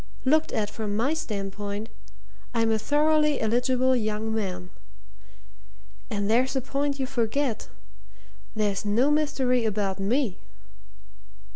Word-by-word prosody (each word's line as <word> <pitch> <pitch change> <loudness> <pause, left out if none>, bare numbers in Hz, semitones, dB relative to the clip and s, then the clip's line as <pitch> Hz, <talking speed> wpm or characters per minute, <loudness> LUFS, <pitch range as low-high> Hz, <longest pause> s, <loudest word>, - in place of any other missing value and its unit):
Looked 310 +4 +3
at 210 -3 -1
from 210 -2 -3
my 260 +7 +2
standpoint, 205 -6 -4 0.7
I'm 225 -1 +2
a 220 - +2
thoroughly 300 +2 +3
eligible 250 +3 +2
young 215 -1 -1
man. 185 -4 -3 1.4
And 205 -3 -1
there's 250 +5 +2
a 265 - +1
point 280 +2 -1
you 265 - 0
forget 245 0 -1 0.9
there's 205 -3 0
no 230 +8 +2
mystery 265 -5 +2
about 200 -3 -1
me!" 220 +1 0
230 Hz, 115 wpm, -26 LUFS, 210-270 Hz, 1.4 s, Looked